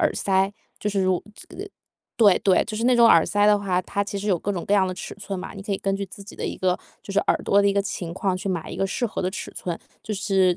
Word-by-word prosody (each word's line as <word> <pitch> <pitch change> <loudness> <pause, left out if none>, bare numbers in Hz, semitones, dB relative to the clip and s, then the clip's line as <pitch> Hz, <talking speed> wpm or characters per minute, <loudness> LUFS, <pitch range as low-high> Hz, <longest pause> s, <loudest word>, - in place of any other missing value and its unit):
耳 - - +3
塞， 195 0 +1 0.3
就 210 - -2
是 195 -1 +1
如 185 -1 +1
这 - - -13 0.7
对 205 -5 +6
对， 190 -2 +4
就 215 -1 -5
是 230 - -1
那 250 0 +5
种 235 -1 +7
耳 165 - +6
塞 205 0 +2
的 210 -1 +5
话， 185 -3 0
它 200 +2 -2
其 200 0 -4
实 205 +1 -3
有 180 -4 +3
各 205 - -2
种 175 - -4
各 205 - +3
样 190 -2 +4
的 185 - -2
尺 - - -7
寸 200 -2 -5
嘛， 190 - -8
你 195 - -8
可 200 -1 -3
以 195 - -1
根 195 0 -1
据 200 - -3
自 200 +2 -11
己 200 - -12
的 - - -4
一 - - -4
个 185 -1 +1 0.2
就 195 - -7
是 200 - +2
耳 - - +2
朵 200 0 +4
的 - - +3
一 200 - +3
个 200 - +2
情 180 -3 -4
况 185 0 -1
去 185 - -7
买 170 -4 -3
一 - - -6
个 195 - +1
适 240 +5 -1
合 215 - -4
的 185 - 0
尺 - - -6
寸， 175 -2 -4 0.2
就 215 - -4
是 190 -3 +2
195 Hz, 330 characters per minute, -24 LUFS, 185-205 Hz, 0.7 s, 种